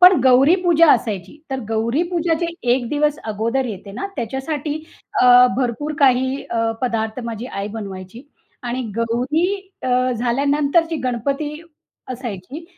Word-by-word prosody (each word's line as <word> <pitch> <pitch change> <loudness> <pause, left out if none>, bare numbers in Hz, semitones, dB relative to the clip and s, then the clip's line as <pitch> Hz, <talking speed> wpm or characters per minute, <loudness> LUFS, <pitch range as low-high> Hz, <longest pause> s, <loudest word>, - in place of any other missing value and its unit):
पण 360 -5 +8
गौरीपूजा 325 +5 +5
असायची. 210 - -2
तर 265 -1 -2
गौरीपूजा 325 +10 0
जे 340 - 0 0.3
एक 245 -2 0
दिवस 295 +1 +1
अगोदर 230 +6 0
येते 200 -3 -7
ना, 395 - -4
त्याच्यासाठी 275 +5 -3 0.5
अ, 250 0 +8
भरपूर 270 +4 -1
काही 260 0 +3
अ, 230 -1 +1
पदार्थ 225 -1 -1
माझी 230 +1 -5
आई 200 -3 -4
बनवायची 195 +2 -8 0.4
आणि 245 +1 -3
गौरी 245 +9 +1 0.4
अ, - - -2 0.2
झाल्यानंतर 280 +7 +2
जी 325 - -1
गणपती 275 +5 -1 0.6
असायची, 245 - -7
255 Hz, 125 wpm, -20 LUFS, 230-295 Hz, 0.6 s, पण